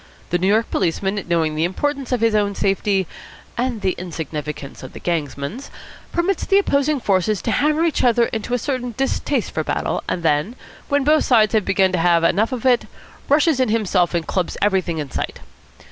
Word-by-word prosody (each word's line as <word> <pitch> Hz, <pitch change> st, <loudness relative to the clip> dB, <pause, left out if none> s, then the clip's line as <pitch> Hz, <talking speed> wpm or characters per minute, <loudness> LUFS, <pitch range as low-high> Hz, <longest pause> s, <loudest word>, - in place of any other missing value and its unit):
The 175 Hz, -, +1 dB
New 185 Hz, -, +1 dB
York 220 Hz, +3 st, +2 dB
policeman, 190 Hz, +4 st, -1 dB
knowing 165 Hz, -2 st, +1 dB
the 155 Hz, +1 st, -1 dB
importance 275 Hz, -, -2 dB
of 250 Hz, -3 st, 0 dB
his 230 Hz, -1 st, +3 dB
own 205 Hz, -1 st, +1 dB
safety, 195 Hz, -1 st, +1 dB, 0.5 s
and 245 Hz, -3 st, -2 dB
the 190 Hz, -, +1 dB
insignificance 150 Hz, -5 st, -6 dB
of 130 Hz, -, -10 dB
the -, -, -9 dB
gangsman's, 165 Hz, -, -3 dB, 0.4 s
permits 345 Hz, +2 st, 0 dB
the 390 Hz, -, +3 dB
opposing 285 Hz, -6 st, +2 dB
forces 200 Hz, -2 st, +1 dB
to 225 Hz, -, 0 dB
hammer 305 Hz, +6 st, +2 dB
each 330 Hz, -4 st, +1 dB
other 240 Hz, -1 st, +4 dB
into 225 Hz, +2 st, -3 dB
a -, -, +1 dB
certain 250 Hz, -2 st, -3 dB
distaste 270 Hz, -1 st, -1 dB
for 155 Hz, -, -2 dB
battle, -, -, -2 dB
and 175 Hz, -, -2 dB
then, 155 Hz, +8 st, +1 dB, 0.3 s
when 285 Hz, -1 st, +2 dB
both 305 Hz, +2 st, +3 dB
sides 220 Hz, -4 st, +4 dB
have 215 Hz, -4 st, +2 dB
begun 190 Hz, -1 st, +2 dB
to 180 Hz, -, 0 dB
have 170 Hz, 0 st, +3 dB
enough 205 Hz, +8 st, +2 dB
of 255 Hz, -1 st, -4 dB
it, 250 Hz, -2 st, +3 dB, 0.4 s
rushes 295 Hz, 0 st, +3 dB
in 255 Hz, -, +2 dB
himself 195 Hz, -5 st, +1 dB
and 170 Hz, -1 st, -1 dB
clubs 185 Hz, -2 st, -2 dB
everything 190 Hz, -5 st, +1 dB
in 145 Hz, -3 st, -4 dB
sight. -, -, -4 dB
210 Hz, 190 wpm, -20 LUFS, 175-255 Hz, 0.5 s, other